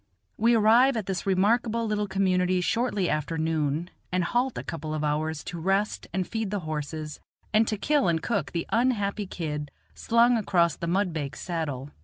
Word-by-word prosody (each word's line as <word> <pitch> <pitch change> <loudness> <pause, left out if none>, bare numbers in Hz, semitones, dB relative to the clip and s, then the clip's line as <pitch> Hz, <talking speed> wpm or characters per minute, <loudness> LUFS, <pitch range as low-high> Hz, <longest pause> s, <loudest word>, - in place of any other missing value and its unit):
We 230 +2 +3
arrive 230 +4 +5
at 215 - -2
this 190 0 -3
remarkable 225 +4 +2
little 210 -1 -1
community 185 -1 +1
shortly 205 +1 0
after 155 +2 -1
noon, 160 +1 -1 0.2
and 180 0 +1
halt 245 +8 0
a - - -4
couple 155 0 -5
of 155 - -2
hours 150 +1 -1
to 175 - -6
rest 195 +5 0
and 185 -1 -1
feed 225 -3 -2
the 205 -1 -2
horses, 155 -1 -5 0.3
and 215 +1 +4
to 215 - -1
kill 290 +5 +2
and 165 -1 +2
cook 200 - -2
the 170 - -2
unhappy 215 -4 +1
kid 150 -5 -4 0.2
slung 235 +1 +3
across 175 -6 +2
the 170 - -5
mudbake's 170 -6 -1
saddle. 145 -6 -4
185 Hz, 175 wpm, -27 LUFS, 160-215 Hz, 0.3 s, arrive